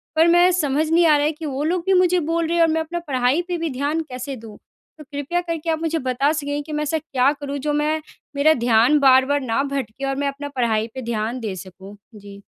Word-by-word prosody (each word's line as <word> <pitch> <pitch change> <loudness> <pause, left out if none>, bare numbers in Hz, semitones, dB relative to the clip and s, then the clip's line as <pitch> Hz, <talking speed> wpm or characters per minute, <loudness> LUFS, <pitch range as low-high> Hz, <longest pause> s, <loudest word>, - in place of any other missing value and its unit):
पर 320 +2 +5
मैं 350 +1 +5
समझ 310 -3 0
नहीं 340 +1 +4
आ 305 - +6
रहा 290 - +1
है 305 - +2
कि 315 +1 -9
वो 280 0 -3
लोग 345 +2 0
भी 385 - +3
मुझे 365 -1 +3
बोल 335 0 +1
रहे 340 - -1
हैं 335 - +5
और 330 - +3
मैं 320 0 0
अपना 345 +2 -4
पढ़ाई 260 +4 +1
पे 355 -1 -2
भी 330 -1 -2
ध्यान 285 +4 -1
कैसे 255 +2 -6
दूँ? 225 -3 -12 0.4
तो 305 - -11
कृपया 285 +4 -3
करके 335 -2 -4
आप 320 -1 0
मुझे 325 0 -1
बता 260 +2 0
सकेंगे 290 -1 -3
कि 305 - -10
मैं 300 - -1
ऐसा 300 +2 -1
क्या 275 -3 +1
करूँ, 285 0 -4
जो 295 +2 -2
मैं 305 +1 0 0.3
मेरा 305 +3 +4
ध्यान 240 +5 +4
बार-बार 270 +1 +4
ना 245 0 0
भटके 275 -2 -4
और 270 - -1
मैं 285 +1 -1
अपना 280 +1 -5
पढ़ाई 225 -3 0
पे 260 - -6
ध्यान 230 +1 -3
दे 215 -5 -4
सकूँ? 190 +2 -11 0.2
जी। 200 -1 -12
285 Hz, 250 wpm, -21 LUFS, 255-320 Hz, 0.4 s, आ